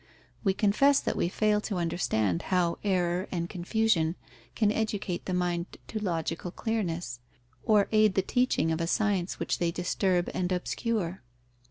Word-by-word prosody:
We 195 -3 +2
confess 255 +8 +4
that - - -2
we 170 - 0
fail 210 +2 +2
to 205 - -3
understand 110 - 0
how 180 -2 +1
error 180 -2 +1
and 170 -2 -2
confusion 180 -2 +1 0.4
can 210 -2 +3
educate 205 -5 -2
the 185 - -1
mind 175 -1 -2
to 220 - -3
logical 170 -3 -2
clearness, 175 - -3 0.4
or 210 -3 +3
aid 215 -3 +4
the 190 - +2
teaching 245 -8 +1
of 160 +1 -1
a 165 - 0
science 195 -2 0
which - - -1
they 170 - +1
disturb 180 +1 0
and 180 0 -1
obscure. 185 0 -2
185 Hz, 155 wpm, -29 LUFS, 170-210 Hz, 0.4 s, confess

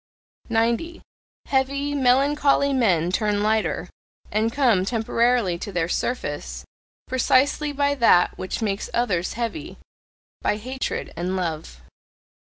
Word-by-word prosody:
90. 235 +9 0 0.4
Heavy, 280 +2 0
melancholy 280 +1 +3
men 180 -10 +2
turn 205 +1 0
lighter, 220 +1 0 0.4
and 220 +2 +1
come 235 -8 +3
temporarily 230 -3 +1
to 200 - -6
their 175 -3 0
surface, 145 - -3 0.4
precisely 265 +3 +2
by 285 0 +1
that 230 -9 +4
which 185 +5 -4
makes 200 -1 -2
others 195 -7 0
heavy 240 +7 -5 0.6
by 210 - 0
hatred 260 +4 -4
and 180 +2 -2
love. 160 - -4
230 Hz, 110 wpm, -23 LUFS, 185-265 Hz, 0.6 s, that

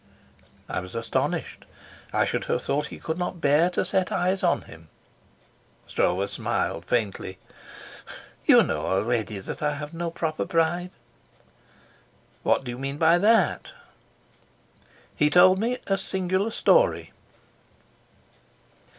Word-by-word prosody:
I - - -2
was 90 +2 -9
astonished. 115 0 -2 0.5
I - - +2
should - - -2
have - - -1
thought 150 +1 -1
he - - -9
could 160 +2 -4
not 180 0 -3
bear 150 +3 +3
to 180 - -1
set 185 0 0
eyes 185 +2 0
on 175 - +1
him. 80 +1 -15 1.0
Stroeve 95 +3 0
smiled 85 -3 -2
faintly. 100 -5 -2 1.1
"You - - +7
know - - -2
already 110 +2 -1
that 95 - -7
I 150 -1 0
have 150 +2 -7
no 170 0 -3
proper 160 -1 -3
pride." 170 +2 0 1.5
"What - - +1
do 125 - -5
you 120 - -7
mean 135 +1 -4
by 165 +2 +4
that?" 210 -3 +3 1.5
He 150 - +3
told 185 +3 +6
me 240 +4 0
a 195 -1 0
singular 190 +2 -1
story. - - +2
160 Hz, 125 wpm, -25 LUFS, 120-185 Hz, 1.5 s, You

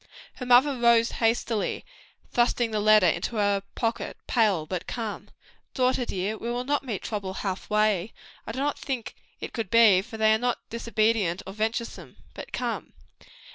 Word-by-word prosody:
Her 250 - -6
mother 260 +3 +5
rose 235 -1 +4
hastily, 225 -1 0 0.5
thrusting 240 -1 +1
the 215 - 0
letter 215 -2 +5
into 180 +6 0
her 205 -2 +1
pocket, 230 -1 -2
pale 205 -9 +2
but 180 +1 -5
calm. 225 -4 -5 0.5
"Daughter 255 -1 +1
dear, 200 +1 -3
we 235 - -4
will 245 +1 -2
not 285 +2 0
meet 225 -8 -4
trouble 200 -4 -4
half 190 -3 -4
way. 210 -2 +1 0.4
I - - -3
do 230 - -8
not 285 +2 -1
think 260 -5 -4 0.3
it - - -7
could 225 -6 -3
be 230 - +3
they; 210 -5 +7
for 220 +2 -10
they 220 0 +4
are 220 - +1
not 245 0 0
disobedient 220 -5 0
or 195 - -7
venturesome. 225 +2 -3 0.2
But - - -9
come." - - -4
225 Hz, 175 wpm, -26 LUFS, 205-240 Hz, 0.5 s, they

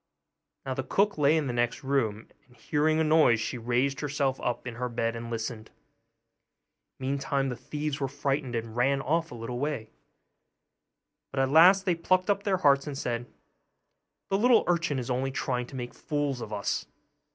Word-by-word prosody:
Now 135 - -2
the 130 - -2
cook 200 +7 +1
lay 150 +2 +4
in 155 - 0
the 125 - -2
next 120 +3 -1
room; 115 -6 0 0.2
and 125 -2 -23
hearing 155 +6 +1
a - - +3
noise 155 -7 +4
she 120 +2 -3
raised 125 +4 0
herself 140 -2 -1
up 125 - -2
in 120 - -5
her 125 0 -2
bed 115 -1 -1
and 115 0 -6
listened. 115 -1 -4 1.3
Meantime 135 0 -1
the 125 - -3
thieves 150 +2 -4
were 135 - 0
frightened, 140 -2 -2
and 115 -1 -4
ran 135 +3 +2
off 165 +5 0
a - - -7
little 120 +1 -5
way; 140 -6 -3 1.4
but 135 - -4
at 135 0 +2
last 185 +5 +7
they 180 - +3
plucked 185 +3 +2
up 200 - 0
their 200 -2 +1
hearts, 140 -5 +3
and 145 -2 -4
said, 120 -2 -3 1.0
'The 195 - +2
little 245 +1 +5
urchin 170 -5 +1
is 125 0 -3
only 130 +2 0
trying 125 -2 -2
to 135 - -11
make 120 -1 -5
fools 145 -4 -2
of 110 - -7
us. 105 -1 -2
135 Hz, 185 wpm, -28 LUFS, 120-150 Hz, 1.4 s, last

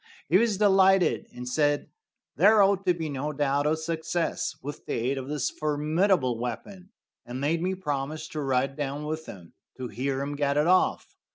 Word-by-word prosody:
He 185 - +5
was 225 -3 +1
delighted, 195 -2 +4
and 125 0 -8
said 145 +3 0 0.4
there 210 0 +6
ought 195 -1 +1
to 180 - +5
be 165 -2 -4
no 145 +1 -3
doubt 145 0 +1
of 155 +1 +1
success 165 +1 -2
with 145 +2 -7
the - - -2
aid 130 +4 -1
of 130 - -7
this 145 -3 -1
formidable 150 - +1
weapon, 180 - -6 0.3
and 125 +1 -6
made 155 +4 0
me 185 +2 -1
promise 150 -2 -3
to 155 - -4
ride 135 0 0
down 145 +1 -4
with 155 +1 -4
him 90 -4 -11 0.2
to 130 -2 -5
hear 135 +2 -2
him 145 +1 -4
get 140 0 0
it 150 - +3
off. 185 +2 +2
150 Hz, 185 wpm, -27 LUFS, 135-175 Hz, 0.4 s, there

